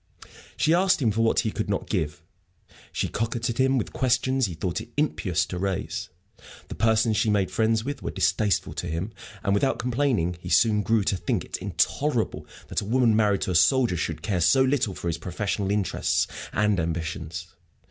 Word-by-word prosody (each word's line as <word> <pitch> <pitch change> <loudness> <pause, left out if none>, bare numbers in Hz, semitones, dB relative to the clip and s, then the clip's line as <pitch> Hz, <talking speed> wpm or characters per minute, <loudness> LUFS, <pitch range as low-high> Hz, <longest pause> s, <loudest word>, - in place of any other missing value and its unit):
She 160 - +3
asked 185 +2 +3
him 120 -6 +2
for 110 +3 0
what 115 - +3
he 110 - -2
could 105 -1 -3
not 100 - -1
give; 80 -7 -2 0.7
she - - -1
coquetted 120 +3 0
with 115 - -3
questions 130 0 +1
he 85 - -6
thought 85 +2 -2
it - - -11
impious 100 - 0
to 90 - -5
raise; 85 -4 -3 0.6
the - - -5
persons 110 0 +2
she 110 +1 +2
made 100 -3 +1
friends 110 0 +1
with 145 0 -4
were - - -3
distasteful 105 -6 +1
to 90 - -4
him; 85 +7 -3 0.3
and, 100 - +1
without 130 +7 +1
complaining, 120 - 0
he - - -8
soon 105 -2 +4
grew 110 +1 +2
to 95 - 0
think 85 - -2
it - - -5
intolerable 140 -6 -1 0.2
that - - -1
a - - -6
woman 120 0 +3
married 105 -3 +2
to - - -1
a - - -1
soldier 105 - +4
should 80 -2 -3
care 100 -5 0
so 130 +10 +5
little 130 -7 +1
for - - -8
his 80 -1 -1
professional 95 +3 -2
interests 100 -1 +1 0.3
and 105 -3 +1
ambitions. 85 +1 -4
105 Hz, 190 wpm, -25 LUFS, 90-120 Hz, 0.7 s, so